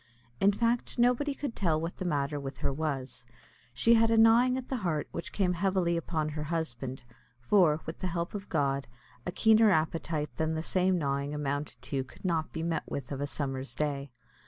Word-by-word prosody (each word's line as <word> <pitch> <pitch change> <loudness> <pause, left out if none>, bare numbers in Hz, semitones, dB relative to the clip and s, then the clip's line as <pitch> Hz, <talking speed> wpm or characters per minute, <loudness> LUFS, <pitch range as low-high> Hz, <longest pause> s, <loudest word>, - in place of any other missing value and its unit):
In 200 - +5
fact 235 +4 0
nobody 250 +4 +2
could 280 -6 -4
tell 165 -5 +1
what 165 +2 -4
the 185 - -4
matter 145 -3 0
with 135 -1 -6
her 140 - +2
was. 135 -5 -3 0.5
She 125 - +4
had 225 0 +5
a 225 - +3
gnawing 235 +3 +6
at 260 - -5
the 265 - -2
heart 170 -8 -1
which 170 - -5
came 185 -3 +1
heavily 180 -1 +1
upon 160 -2 -1
her 150 0 -4
husband; 135 -6 -3 0.4
for, 155 +3 +3
with 160 - -6
the 185 - -2
help 170 -1 -3
of 205 -1 -6
God, 140 -3 0 0.4
a - - -1
keener 220 +2 +5
appetite 155 -2 0
than 160 0 0
the 160 - -2
same 185 +1 +2
gnawing 140 -1 -1
amounted 145 0 -3
to 135 -2 -2
could 130 +8 -15
not 165 -3 0
be 160 - -4
met 165 -1 0
with 140 -1 -5
of 140 0 -3
a 145 - -1
summer's 135 -2 -4
day. 145 -2 -2
160 Hz, 200 wpm, -30 LUFS, 145-195 Hz, 0.5 s, gnawing